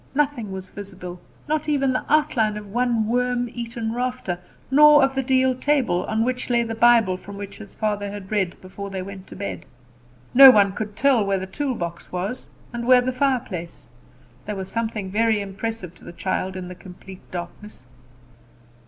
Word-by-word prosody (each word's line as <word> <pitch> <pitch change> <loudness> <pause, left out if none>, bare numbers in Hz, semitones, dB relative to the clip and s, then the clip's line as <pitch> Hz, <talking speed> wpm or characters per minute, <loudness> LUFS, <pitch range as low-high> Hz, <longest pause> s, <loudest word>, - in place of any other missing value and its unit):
Nothing 280 -8 0
was 190 0 -7
visible, 185 -3 -8 0.3
not 305 0 -1
even 275 -3 +2
the - - -1
outline 270 -9 +2
of 210 - -7
one 235 -1 +1
worm 245 +1 0
eaten 230 -1 -4
rafter, 245 -7 -3 0.3
nor 295 +1 +7
of 270 0 +2
the 270 - 0
deal 260 0 +2
table, 255 -10 +1
on 220 +1 +1
which 255 0 -2
lay 240 -1 +3
the 230 -1 -4
Bible 225 -5 +4
from 200 +2 -10
which 200 -1 -8
his 205 -2 -12
father 205 -2 -1
had 200 -1 -8
read 195 -4 -1
before 200 +2 -8
they 190 -1 -4
went 195 0 -9
to - - -11
bed. 200 - -5 0.7
No 270 +1 +11
one 205 -5 +5
could 210 0 -5
tell 265 -4 +3
where 195 -1 0
the 190 - -4
toolbox 190 - -4
was, 195 +7 -4 0.3
and 235 0 -4
where 255 -1 +7
the 255 +1 -2
fireplace. 250 -11 -2 0.6
There 210 - -3
was 190 -1 -5
something 220 -3 -3
very 220 +1 +2
impressive 200 -2 -5
to - - -20
the - - -10
child 185 +1 -2
in 185 -1 -6
the 180 - -7
complete 185 +1 -12
darkness. 175 -2 -8
220 Hz, 180 wpm, -23 LUFS, 190-250 Hz, 0.7 s, No